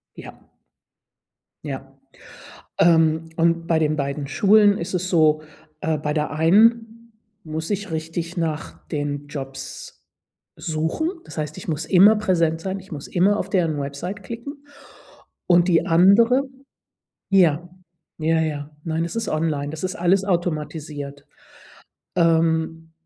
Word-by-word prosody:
Ja. - - -11 1.3
Ja. - - -7 0.8
Ähm, 160 -1 +3
und 165 0 +1
bei 165 -1 +2
den 155 -1 +1
beiden 140 0 -3
Schulen 205 +7 +4
ist 175 +3 -5
es 180 0 -1
so: 155 -3 +3 0.4
Äh, 160 -1 -1
bei 150 0 -2
der 150 0 -1
einen 225 +8 +2 0.3
muss 160 +2 -5
ich 205 -2 -3
richtig 165 +2 -4
nach 160 -2 -4
den 145 -2 -3
Jobs 135 -2 -8 0.5
suchen, 160 - -2
das - - -12
heißt 150 -1 -4
ich - - -9
muss 155 -1 -2
immer 195 +3 +6
präsent 170 -6 +1
sein, 190 +2 -4
ich 190 - -16
muss 145 -2 -7
immer 200 +4 +2
auf 195 - -4
deren 170 -6 +1
Website 145 +9 -5
klicken, 275 +7 -8 0.8
und 175 0 +4
die 170 -2 +3
andere 215 +10 +5 0.9
ja, 175 -3 +3 0.5
ja, 160 +1 +2
ja, 150 -2 -3
nein, 165 0 -1
es 170 - -6
ist 230 0 -2
online, 155 -2 -1
das 155 +2 -7
ist 185 0 -2
alles 185 +3 +2
automatisiert. 150 -5 -3 0.9
Ähm, 165 -1 +1
165 Hz, 135 wpm, -22 LUFS, 155-185 Hz, 1.3 s, immer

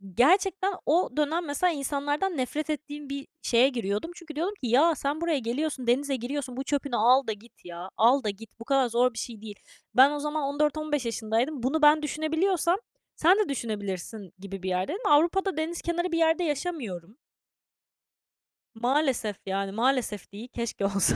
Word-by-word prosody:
Gerçekten 380 - +3
o 335 +5 +3
dönem 315 +3 +1
mesela 325 +4 +1
insanlardan 290 +5 -1
nefret 295 +5 -2
ettiğim 295 -1 -5
bir 275 0 -5
şeye 245 +3 +4
giriyordum 230 - -3
çünkü 320 -4 -10
diyordum 350 +6 -1
ki, - - 0
"Ya, 305 +8 +5
sen 285 +3 -2
buraya 335 -4 +1
geliyorsun, 255 +2 -3
denize 275 +3 +2
giriyorsun, 255 +1 -4
bu 265 - -2
çöpünü 280 -1 -1
al 250 +4 +4
da 220 - 0
git 215 0 -19
ya, 175 +1 -8
al 250 +4 +5
da 215 - 0
git." 215 +3 -10
Bu 230 - -9
kadar 270 -2 +3
zor 245 +2 +2
bir - - -12
şey 225 -2 -6
değil. 215 -2 -8 0.4
Ben 265 +3 +7
o 295 - -3
zaman 300 +1 -2
14-15 295 0 0
yaşındaydım. 230 +4 -1
Bunu 290 +5 +1
ben 300 +1 +6
düşünebiliyorsam 320 +4 +1 0.4
sen 360 +6 +5
de 420 - +1
düşünebilirsin 205 -5 -4
gibi 195 -1 -8
bir 190 - -2
yerdeydim. 290 - -1
Avrupa'da 340 +5 +3
deniz 325 +2 -2
kenarı 345 +1 -1
bir 335 - 0
yerde 325 +1 +3
yaşamıyorum. 270 - -4 1.6
Maalesef, 245 -3 0
yani, 195 0 -2
maalesef 230 -2 0
değil, 215 +5 -9
keşke 235 -5 -3
olsa 195 -1 +2
275 Hz, 170 wpm, -27 LUFS, 230-310 Hz, 1.6 s, Ben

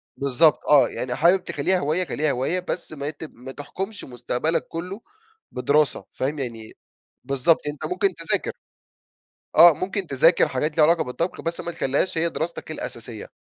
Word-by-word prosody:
بالضبط 140 +3 +3
آه، 140 -5 +6
"يعني 125 -1 -4
حابب 180 +3 +3
تخلِّيها 185 -1 0
هِواية 165 +5 0
خلِّيها 150 0 0
هِواية 135 +8 -1
بس 180 -2 -4
ما 140 0 -3
ت 155 +1 -9
ما 130 -3 -9
تحكُمش 190 +9 -6
مستقبلك 125 +6 -2
كله 180 +6 -6 0.5
بدراسة."، 140 +2 +1
فاهم 140 +3 -3
يعني؟ 115 -4 -5 0.5
بالضبط، 140 +4 +2
أنتَ 145 0 -5
ممكن 390 +2 +1
تذاكر. - - -1 1.0
آه 170 -1 +9
ممكن 190 +2 -3
تذاكر 165 +6 +4
حاجات 150 +4 -2
ليها 155 - +6
علاقة 165 +1 +3
بالطَّبخ، 165 +8 -3
بس 165 0 -3
ما 170 - -4
تخليهاش 145 +5 0
هي 170 +1 +3
دراستك 160 0 -5
الأساسيَّة. 115 -6 -7
155 Hz, 155 wpm, -23 LUFS, 135-170 Hz, 1.0 s, آه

